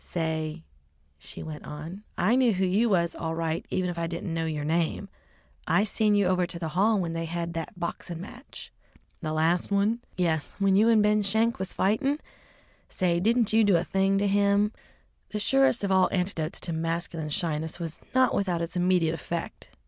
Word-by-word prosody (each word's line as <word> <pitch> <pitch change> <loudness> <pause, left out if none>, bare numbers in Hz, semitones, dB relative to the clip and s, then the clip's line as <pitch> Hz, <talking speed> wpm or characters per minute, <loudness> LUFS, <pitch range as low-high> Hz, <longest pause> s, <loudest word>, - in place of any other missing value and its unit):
"Say," 160 -1 -3 0.6
she - - -8
went 155 -2 -7
on, 160 +7 -8
"I 210 +7 +3
knew 255 -3 +4
who 190 0 +1
you 205 +6 +2
was 170 -4 +2
all 165 0 -4
right 165 0 -2
even 185 -1 0
if 175 -1 -4
I 165 - -1
didn't 170 +1 -4
know 165 0 -1
yer 150 -2 -3
name. 165 +5 -1 0.6
I 200 - +3
seen 215 0 +2
you 205 -1 +3
over 180 -1 +2
to 170 - -6
the 165 -2 -4
hall 200 +6 +2
when 170 -3 -2
they 165 0 -2
had 170 0 -4
the 165 -2 -3
boxin' 170 -1 -5
match." 240 +9 -10 0.5
"The 155 -2 -3
last 165 +3 +1
one?" 205 +3 +1 0.2
"Yes, 160 -4 0
when 195 -1 +3
you 215 +3 +5
and 220 -2 +5
Ben 210 0 +3
Schenk 220 +3 +1
was 190 -1 -3
fightin'. 270 +9 +1 0.7
Say, 180 -3 0
you 170 - 0
didn't 230 +4 +3
do 215 -3 +4
a 170 - 0
thing 195 +1 +1
to 200 +1 +1
him!" 200 +1 +3 0.6
The 210 - -3
surest 270 +1 +3
of 200 - 0
all 190 -1 +4
antidotes 180 -4 -2
to 170 - -3
masculine 165 -1 -3
shyness 160 -1 -2
was 165 -2 -5
not 260 -1 +4
without 180 -4 0
its 170 +2 -5
immediate 180 -2 +2
effect. 170 0 -5
180 Hz, 195 wpm, -27 LUFS, 165-205 Hz, 0.7 s, you